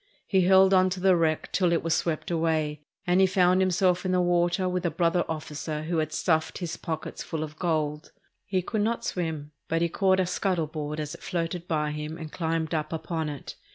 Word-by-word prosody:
He 190 -2 +3
held 190 +1 +6
on 185 0 +5
to 185 0 -4
the 190 0 +4
wreck 160 -2 0
till 180 -3 +2
it 170 - +1
was 165 -1 +1
swept 165 0 -1
away, 160 -3 0 0.2
and 180 +2 +3
he 190 - +6
found 185 0 +3
himself 180 -1 +2
in 185 - -1
the 185 - +3
water 175 +1 +2
with 180 0 -1
a 175 - +1
brother 175 0 +1
officer 155 -1 -4
who 165 +1 -1
had 155 -1 -1
stuffed 160 -1 0
his 170 -3 -4
pockets 160 -1 -5
full 160 -2 -3
of 155 0 -9
gold. 155 -3 -1 0.4
He 190 -2 0
could 215 +3 -1
not 230 +2 -1
swim, 160 -4 -3 0.2
but 165 +1 +1
he 170 - +1
caught 190 +2 +2
a 185 - +3
scuttle 180 -2 0
board 150 0 -5
as 150 0 -4
it 170 - -11
floated 175 -1 -3
by 150 -2 0
him 150 +1 -5
and 160 -2 -8
climbed 165 -1 -2
up 155 -2 -1
upon 160 -1 -3
it. 145 -2 -7
170 Hz, 220 wpm, -27 LUFS, 155-185 Hz, 0.4 s, held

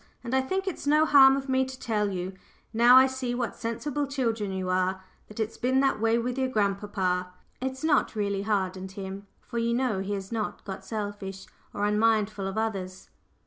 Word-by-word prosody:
And 240 +1 -5
I 265 - +4
think 380 +9 -2
it's 350 -5 -4
no 305 +2 +5
harm 270 -3 +7
of 275 0 -5
me 260 0 +2
to 260 0 -7
tell 210 -3 0
you, 185 0 -4 0.4
now 240 +2 +7
I 260 - +8
see 260 -2 -3
what 245 -3 -2
sensible 280 +5 -3
children 230 -7 -1
you 190 -1 -3
are, 185 +1 0 0.2
that 215 - -11
it's 220 0 -2
been 260 +2 +2
that 270 -6 +1
way 225 +1 +3
with 245 +2 -2
your 260 - +1
grandpapa. 200 -5 -1 0.3
It's 265 +2 -4
not 315 -6 +2
really 200 -2 -1
hardened 190 -2 -2
him, 195 0 -7
for 235 - -5
you 235 0 +1
know 245 -6 0
he 195 +2 -3
has 195 0 -5
not 215 -2 -3
got 190 -1 -6
selfish 205 -2 -5 0.3
or 205 - -1
unmindful 210 -1 +1
of 195 +2 -5
others. 195 -4 -3
220 Hz, 195 wpm, -27 LUFS, 195-260 Hz, 0.4 s, I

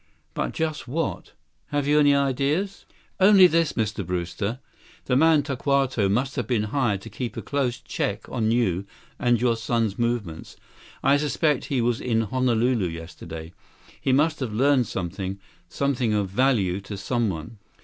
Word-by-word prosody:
But - - -2
just 155 -4 -3
what? 155 +5 -3 0.3
Have 145 -1 -1
you 150 +1 +4
any 145 -1 +5
ideas?" 140 +8 0 0.3
"Only 195 -1 +8
this, 165 -2 +3
Mr. 110 -2 -2
Brewster. 90 +5 -3 0.5
The 125 - +1
man 155 +1 +5
Tokawto 135 -6 +1
must 130 +7 0
have 120 -4 -1
been 120 -5 +1
hired 120 -9 +1
to 115 - -9
keep 120 +2 -5
a - - -3
close 135 -4 -1
check 105 -4 -3
on 110 -4 -1
your 100 -6 +1 0.3
and 120 -2 +2
your 120 -1 +2
son's 115 -2 -1
movements. 115 -9 -2 0.5
I 140 +1 +5
suspect 150 -1 0
he 135 -4 0
was 120 0 0
in 115 -2 +1
Honolulu 120 -2 +1
yesterday. 80 0 -8 0.5
He 135 - +1
must 150 +4 +2
have 130 -5 -3
learned 130 +1 +3
something—something 100 +7 -3
of 100 -2 0
value 100 -5 +1
to 100 +1 -7
someone." 100 -4 -2
120 Hz, 150 wpm, -24 LUFS, 100-140 Hz, 0.5 s, Only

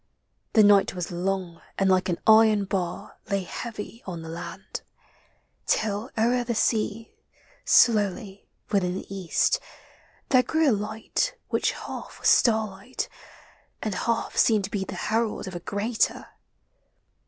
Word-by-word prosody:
The 220 - +6
night 205 -2 +5
was 180 -1 -4
long 180 -1 -3 0.2
and 195 - +2
like 185 0 +3
an 175 - 0
iron 220 -2 +6
bar 180 -3 -4
Lay 195 -1 0
heavy 225 +4 -7
on 170 -3 -5
the 160 - -8
land: 165 +1 -7 0.9
till 215 +2 0
o'er 240 +2 +2
the 235 -1 -2
sea 220 0 0 0.5
Slowly, 205 -3 +3 0.2
within 185 -3 +1
the 195 +1 -7
East, 190 - +1 0.7
there 255 -2 +6
grew 315 +3 +2
a - - +4
light 220 - -2
Which - - +1
half - - -8
was - - +3
starlight, 220 0 +1 0.7
and 215 - -2
half 230 +4 -1
seemed 215 -3 +4
to 190 - -5
be 200 -2 -1
The - - -7
herald 225 -2 -1
of 190 - -6
a 175 - -4
greater. 205 +6 -1
205 Hz, 140 wpm, -26 LUFS, 190-225 Hz, 0.9 s, The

